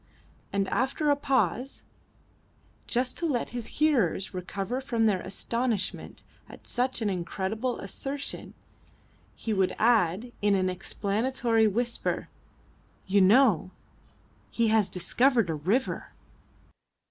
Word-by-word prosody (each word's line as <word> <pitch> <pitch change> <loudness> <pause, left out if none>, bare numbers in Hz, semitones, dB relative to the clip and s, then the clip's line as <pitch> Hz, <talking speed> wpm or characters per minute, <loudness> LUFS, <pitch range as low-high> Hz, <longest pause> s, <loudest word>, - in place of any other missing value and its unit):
And 200 -1 0
after 280 +4 +1
a - - +4
pause 270 -2 0 1.0
just 250 +1 0
to 340 - 0
let 250 -6 -1
his 240 -2 -5
hearers 240 - +2
recover 195 +7 -3
from 235 -4 0
their 195 -4 +2
astonishment 230 +3 -2 0.3
at - - -13
such 250 -1 -1
an 210 - +1
incredible 195 +7 -2
assertion 275 +8 -5 0.8
he 220 - -3
would 190 -2 +1
add 220 -1 +2
in 205 -1 +3
an 185 -1 +1
explanatory 220 +4 0
whisper, 235 +3 -1 0.8
"You 200 +1 +3
know, 205 - +5 0.8
he 230 -1 +1
has 215 -3 +3
discovered 230 +2 +2
a - - -1
river." 190 - -1
225 Hz, 110 wpm, -28 LUFS, 195-255 Hz, 1.0 s, know